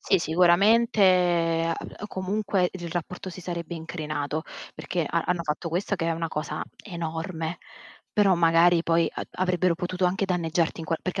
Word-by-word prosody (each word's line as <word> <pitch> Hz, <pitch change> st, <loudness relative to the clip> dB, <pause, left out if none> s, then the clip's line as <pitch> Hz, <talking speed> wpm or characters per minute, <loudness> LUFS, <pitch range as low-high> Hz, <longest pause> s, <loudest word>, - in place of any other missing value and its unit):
Sì, 195 Hz, -, +3 dB
sicuramente, 180 Hz, -1 st, +4 dB
ah, 165 Hz, -, -1 dB
b 205 Hz, -, -8 dB
comunque 195 Hz, -1 st, 0 dB
il 175 Hz, -2 st, -6 dB
r -, -, -7 dB
rapporto 180 Hz, +2 st, -4 dB
si 185 Hz, -, -9 dB
sarebbe 170 Hz, -1 st, -5 dB
incrinato 155 Hz, -2 st, -4 dB, 0.3 s
perché 175 Hz, -2 st, -2 dB
ha 170 Hz, 0 st, 0 dB
hanno 175 Hz, -1 st, 0 dB
fatto 160 Hz, +2 st, -3 dB
questo 185 Hz, +5 st, -1 dB
che 165 Hz, -, -2 dB
è 165 Hz, -, +1 dB
una 165 Hz, 0 st, -2 dB
cosa 150 Hz, 0 st, -4 dB, 0.2 s
enorme, 165 Hz, -2 st, -4 dB, 0.5 s
però 200 Hz, -3 st, +4 dB
magari 170 Hz, 0 st, +4 dB
poi 165 Hz, -1 st, +2 dB
a -, -, -4 dB
avrebbero 180 Hz, -1 st, +1 dB
potuto 180 Hz, +2 st, -1 dB
anche 190 Hz, +3 st, 0 dB
danneggiarti 170 Hz, -3 st, 0 dB
in 160 Hz, -, -7 dB
qual 165 Hz, 0 st, -1 dB
perché 185 Hz, +1 st, -2 dB
175 Hz, 170 wpm, -26 LUFS, 165-185 Hz, 0.5 s, sicuramente